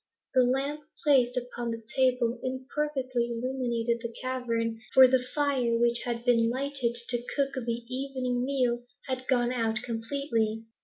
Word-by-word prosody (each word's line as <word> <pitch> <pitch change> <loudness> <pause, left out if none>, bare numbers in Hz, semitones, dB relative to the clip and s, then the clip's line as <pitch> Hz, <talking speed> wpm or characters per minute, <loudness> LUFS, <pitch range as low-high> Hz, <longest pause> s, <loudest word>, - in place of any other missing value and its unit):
The 260 - +5
lamp 275 +4 0 0.2
placed 255 -4 +3
upon 240 -1 -3
the 230 0 -5
table 250 -2 +2
imperfectly 260 -1 -2
illumined 240 -1 -2 0.2
the 235 -1 -4
cavern, 230 -3 -2 0.2
for 260 -1 +10
the 255 0 +3
fire 265 -6 +1
which 235 0 +3
had 235 -1 -3
been 230 -2 +4
lighted 260 -1 -1
to 240 -1 +1
cook 275 -1 0
the 235 -2 -3
evening 255 -2 -2
meal 250 -3 0 0.2
had 260 -1 -4
gone 245 -2 +2
out 225 -2 0
completely. 225 -2 -2
250 Hz, 145 wpm, -28 LUFS, 235-265 Hz, 0.2 s, for